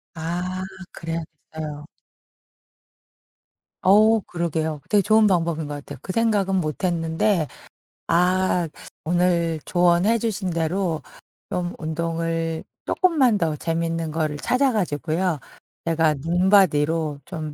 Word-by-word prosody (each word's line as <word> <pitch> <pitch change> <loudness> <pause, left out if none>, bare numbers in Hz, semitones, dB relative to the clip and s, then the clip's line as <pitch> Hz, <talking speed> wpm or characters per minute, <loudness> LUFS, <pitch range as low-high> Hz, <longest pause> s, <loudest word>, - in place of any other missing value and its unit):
아 175 +3 -3 0.3
그래야겠어요. 160 -2 -6 2.0
어 215 +4 +6
그러게요. 160 -4 -2
되게 205 -1 +5
좋은 215 +2 +4
방법인 165 -5 +1
것 145 - -5
같아요. 145 0 -8
그 - - -4
생각은 205 -4 +2
못 155 -1 -2
했는데 165 0 +1 0.6
아 180 0 +2 0.4
오늘 170 -2 +1
조언해 175 +5 +3
주신 210 -4 -2
대로 165 0 -1 0.5
좀 175 0 -2
운동을 165 0 -2 0.2
쪼끔만 280 - +3
더 160 -4 0
재밌는 165 0 -2
거를 155 -2 -1
찾아 255 - +2
가지고요. 165 -2 -1 0.5
제가 160 -2 +2
눈바디로 160 -3 +2
좀 155 -4 -6
170 Hz, 230 characters per minute, -23 LUFS, 160-185 Hz, 2.0 s, 어